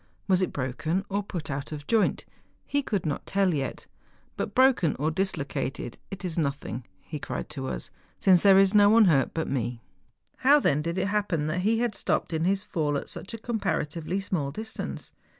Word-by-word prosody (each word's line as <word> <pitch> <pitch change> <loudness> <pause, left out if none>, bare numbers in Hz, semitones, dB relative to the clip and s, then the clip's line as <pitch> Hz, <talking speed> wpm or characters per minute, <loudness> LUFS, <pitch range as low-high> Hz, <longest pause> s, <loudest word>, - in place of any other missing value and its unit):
Was 190 -1 +3
it 185 - 0
broken 145 +8 -2
or 200 +1 0
put 175 -6 -5
out 135 +2 -4
of 145 -2 -6
joint? 220 +4 +1 0.4
He 285 - 0
could 205 -10 -2
not 145 -2 -3
tell 195 -2 +2
yet. 135 -3 -3
^ - - -39 0.4
But - - -4
broken 255 - +4
or 155 +3 0
dislocated 145 -8 -2
it 195 -1 -6
is 170 -2 -1
nothing,' 140 -5 -3
he 150 - -7
cried - - -5
to 135 -2 -5
us, - - -4
' - - -36
since 185 -3 +6
there 195 -1 +7
is 195 0 +5
no 205 -1 +7
one 225 0 +7
hurt 145 -7 +3
but 160 - -1
me.' 120 -3 -2 0.5
How 285 +3 +6
then 150 - +2
did 170 +3 -3
it 190 +1 0
happen 200 -7 0
that 155 +4 -1
he 215 +5 +2
had 235 -1 0
stopped 180 - -1
in 160 +1 0
his 195 +1 +1
fall 150 -7 -1
at - - -6
such 205 - -7
a - - -6
comparatively 190 -6 -2
small 180 -8 -2
distance 220 +10 -6
175 Hz, 205 wpm, -27 LUFS, 145-200 Hz, 0.5 s, there